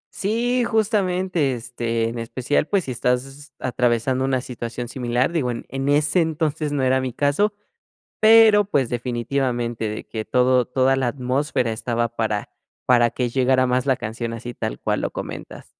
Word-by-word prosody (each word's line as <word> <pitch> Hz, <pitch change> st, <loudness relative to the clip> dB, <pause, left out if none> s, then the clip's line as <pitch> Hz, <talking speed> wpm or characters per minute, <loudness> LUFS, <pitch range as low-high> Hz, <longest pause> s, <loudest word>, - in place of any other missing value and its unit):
Sí, 240 Hz, +5 st, 0 dB
justamente, 185 Hz, -, +1 dB
este, 115 Hz, -1 st, -2 dB
en 115 Hz, +1 st, -5 dB
especial, 130 Hz, +6 st, -1 dB
pues, 200 Hz, -3 st, +1 dB
si 130 Hz, -, -5 dB
estás 135 Hz, +4 st, -2 dB
atravesando 125 Hz, +1 st, 0 dB
una 130 Hz, -1 st, 0 dB
situación 120 Hz, -1 st, -6 dB
similar, 125 Hz, +2 st, -1 dB
digo 155 Hz, -7 st, 0 dB
en 120 Hz, -1 st, -4 dB
en 135 Hz, +1 st, -2 dB
ese 150 Hz, +4 st, +3 dB
entonces 155 Hz, -1 st, -1 dB
no 145 Hz, -2 st, 0 dB
era 130 Hz, 0 st, +2 dB
mi 130 Hz, -2 st, -3 dB
caso, 145 Hz, -, +1 dB, 0.7 s
pero 220 Hz, -1 st, +7 dB
pues, 145 Hz, -11 st, 0 dB
definitivamente 120 Hz, -1 st, -2 dB
de 105 Hz, -, -6 dB
que 110 Hz, -1 st, -4 dB
todo 125 Hz, +2 st, +3 dB
toda 130 Hz, +2 st, +2 dB
la 135 Hz, -2 st, 0 dB
atmósfera 125 Hz, -1 st, -1 dB
estaba 115 Hz, +1 st, -1 dB
para 110 Hz, -2 st, -1 dB, 0.4 s
para 120 Hz, -2 st, +4 dB
que 125 Hz, +1 st, -2 dB
llegara 130 Hz, +1 st, +2 dB
más 125 Hz, +1 st, +1 dB
la 135 Hz, -2 st, +2 dB
canción 115 Hz, +2 st, -4 dB
así 120 Hz, +1 st, -6 dB
tal -, -, -4 dB
cual -, -, -1 dB
lo -, -, -2 dB
comentas. -, -, -7 dB
130 Hz, 165 wpm, -22 LUFS, 120-145 Hz, 0.7 s, pero